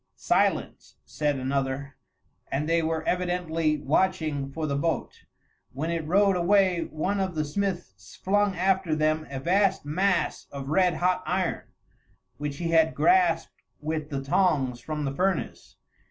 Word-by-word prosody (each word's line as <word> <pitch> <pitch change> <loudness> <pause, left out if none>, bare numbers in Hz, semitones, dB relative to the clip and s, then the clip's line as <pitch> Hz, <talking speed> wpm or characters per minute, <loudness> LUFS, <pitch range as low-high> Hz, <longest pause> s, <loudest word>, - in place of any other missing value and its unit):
"Silence!" - - 0
said 150 -1 -1
another; 135 +1 -2 0.6
and 145 +3 -1
they 165 0 +2
were 160 0 -1
evidently 175 -4 0
watching 150 -2 0
for 160 +2 -3
the 140 -2 -1
boat. 165 +4 -2 0.5
When 155 +6 -3
it 165 -2 -3
rowed 195 +3 +4
away, 180 -1 +3
one 185 +6 -1
of 190 -3 -2
the 155 -1 0
smiths 185 +3 -4
flung 205 0 +1
after 185 -2 +1
them 155 0 0
a 135 -1 -5
vast 190 +3 +1
mass 185 +7 0
of 140 -1 -6
red 180 +1 +3
hot 180 +3 +1
iron, 180 -1 -1 0.7
which 145 0 -4
he 170 +1 -2
had 160 -1 +3
grasped 365 0 +2 0.2
with 155 0 -3
the 135 -2 -3
tongs 140 -5 +1
from 150 +3 -4
the 135 - -2
furnace. 185 +2 -2
160 Hz, 145 wpm, -26 LUFS, 145-185 Hz, 0.7 s, rowed